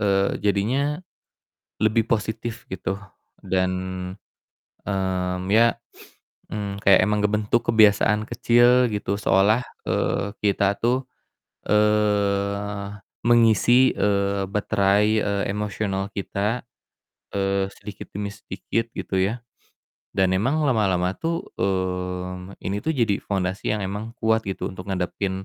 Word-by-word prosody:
eee, 100 Hz, -1 st, +1 dB
jadinya 130 Hz, +10 st, +1 dB, 0.8 s
lebih 110 Hz, +1 st, +3 dB
positif, 110 Hz, +1 st, -2 dB
gitu. 95 Hz, +1 st, -3 dB, 0.5 s
Dan, 95 Hz, -1 st, +1 dB, 1.2 s
mmm, 95 Hz, -2 st, -1 dB
ya, 115 Hz, +1 st, +5 dB, 0.8 s
mmm, 100 Hz, -1 st, -4 dB
kayak 95 Hz, -1 st, +7 dB
emang 105 Hz, 0 st, +1 dB
ngebentuk 105 Hz, +2 st, +1 dB
kebiasaan 105 Hz, 0 st, +4 dB
kecil 120 Hz, +1 st, +4 dB
gitu 100 Hz, -1 st, -1 dB
seolah, 105 Hz, +6 st, +3 dB, 0.3 s
eee, 100 Hz, -, 0 dB
kita 100 Hz, 0 st, +2 dB
tuh, 125 Hz, +3 st, +1 dB, 0.6 s
eee, 100 Hz, -1 st, +1 dB, 0.3 s
mengisi, 120 Hz, +2 st, +5 dB
eee, 100 Hz, -1 st, +1 dB
baterai, 100 Hz, 0 st, +2 dB
eee, 100 Hz, -1 st, 0 dB
emosional 100 Hz, -1 st, -2 dB
kita, 105 Hz, +4 st, -2 dB, 0.7 s
eee, 95 Hz, 0 st, +1 dB
sedikit 105 Hz, 0 st, -10 dB
demi 100 Hz, +1 st, -3 dB
sedikit, 115 Hz, +4 st, -4 dB
gitu 95 Hz, -, -3 dB
ya, 110 Hz, +5 st, -1 dB, 0.8 s
dan 95 Hz, -1 st, +3 dB
emang 135 Hz, +11 st, +1 dB
lama-lama 95 Hz, -7 st, +2 dB
tuh, 165 Hz, +3 st, -2 dB
mmm, 90 Hz, 0 st, -2 dB
ini 100 Hz, +2 st, -2 dB
tuh 160 Hz, -, +1 dB
jadi 110 Hz, -5 st, +1 dB
fondasi 95 Hz, 0 st, -1 dB
yang 100 Hz, -, -4 dB
emang 105 Hz, +4 st, -5 dB
kuat 110 Hz, 0 st, +2 dB
gitu, 95 Hz, -, -3 dB
untuk 95 Hz, +1 st, -9 dB
ngadapin 95 Hz, +1 st, -2 dB
100 Hz, 110 wpm, -23 LUFS, 95-110 Hz, 1.2 s, kayak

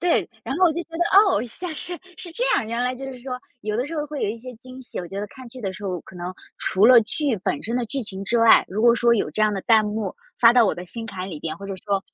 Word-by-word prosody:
对， 350 Hz, -1 st, +2 dB, 0.2 s
然 260 Hz, -, -3 dB
后 370 Hz, -, +4 dB
我 335 Hz, -, +4 dB
就 340 Hz, -, -3 dB
觉 -, -, -49 dB
得， 345 Hz, -, +2 dB
哦， 390 Hz, -, +4 dB
现 300 Hz, +10 st, -7 dB
在 315 Hz, -, -5 dB
是 350 Hz, +3 st, -6 dB, 0.2 s
是 350 Hz, -, -9 dB
这 465 Hz, +9 st, -2 dB
样， -, -, +1 dB
原 230 Hz, +2 st, -3 dB
来 250 Hz, +1 st, 0 dB
就 270 Hz, +2 st, -8 dB
是 260 Hz, -2 st, -7 dB
说， 250 Hz, 0 st, -5 dB, 0.3 s
有 210 Hz, 0 st, -2 dB
的 245 Hz, -, 0 dB
时 325 Hz, +3 st, -6 dB
候 300 Hz, -, -2 dB
会 295 Hz, -1 st, -5 dB
有 -, -, +1 dB
一 220 Hz, -, -5 dB
些 250 Hz, +1 st, -9 dB
惊 255 Hz, +2 st, -11 dB
喜。 255 Hz, -, -6 dB
我 175 Hz, -, -8 dB
觉 195 Hz, +2 st, -6 dB
得 205 Hz, -, -3 dB
看 260 Hz, +2 st, -12 dB
剧 255 Hz, +2 st, -10 dB
的 195 Hz, -4 st, -3 dB
时 205 Hz, -, -11 dB
候 180 Hz, -3 st, -2 dB
可 -, -, -15 dB
能， 180 Hz, +1 st, -5 dB, 0.2 s
除 195 Hz, +3 st, +3 dB
了 245 Hz, -1 st, +9 dB
剧 265 Hz, +4 st, -1 dB
本 185 Hz, -, -2 dB
身 230 Hz, -, -2 dB
的 245 Hz, -1 st, 0 dB
剧 275 Hz, +5 st, -3 dB
情 195 Hz, -4 st, -5 dB
之 235 Hz, +4 st, +1 dB
外， 230 Hz, 0 st, +7 dB
如 200 Hz, +3 st, -3 dB
果 235 Hz, +1 st, +6 dB
说 235 Hz, 0 st, +3 dB
有 225 Hz, -, +1 dB
这 215 Hz, -, 0 dB
样 215 Hz, -, +3 dB
的 195 Hz, -, -2 dB
弹 220 Hz, -2 st, +5 dB
幕， 210 Hz, -2 st, -3 dB, 0.2 s
发 230 Hz, -1 st, +7 dB
到 240 Hz, -1 st, +6 dB
我 -, -, +2 dB
的 180 Hz, -, -7 dB
心 225 Hz, +5 st, -7 dB
坎 190 Hz, -3 st, -6 dB
里 155 Hz, -5 st, -7 dB
边， 160 Hz, -, -4 dB
或 200 Hz, -, -8 dB
者 195 Hz, -, -4 dB
说， 200 Hz, -1 st, +1 dB
230 Hz, 340 characters per minute, -23 LUFS, 205-260 Hz, 0.3 s, 了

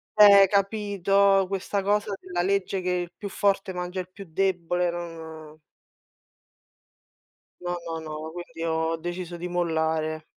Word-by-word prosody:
Eh, 200 Hz, -2 st, +9 dB
capito, 200 Hz, -1 st, +2 dB
questa 195 Hz, +1 st, -2 dB
cosa 205 Hz, 0 st, +1 dB
della 180 Hz, -1 st, -3 dB
legge 195 Hz, 0 st, 0 dB
che 180 Hz, -, -2 dB
il 175 Hz, -1 st, -1 dB
più 200 Hz, -, -6 dB
forte 195 Hz, -1 st, 0 dB
mangia 180 Hz, +1 st, -4 dB
il 185 Hz, 0 st, -5 dB
più 195 Hz, 0 st, -10 dB
debole, 175 Hz, 0 st, 0 dB
non 160 Hz, -2 st, -8 dB, 2.0 s
No, 175 Hz, 0 st, -3 dB
no, 165 Hz, -1 st, -4 dB
no, 155 Hz, -1 st, -6 dB
ma 160 Hz, -, -6 dB
quindi 165 Hz, -1 st, -8 dB
ho 160 Hz, 0 st, 0 dB
deciso 175 Hz, +1 st, -5 dB
di 175 Hz, +1 st, -5 dB
mollare. 160 Hz, -2 st, -1 dB
180 Hz, 140 wpm, -26 LUFS, 165-195 Hz, 2.0 s, Eh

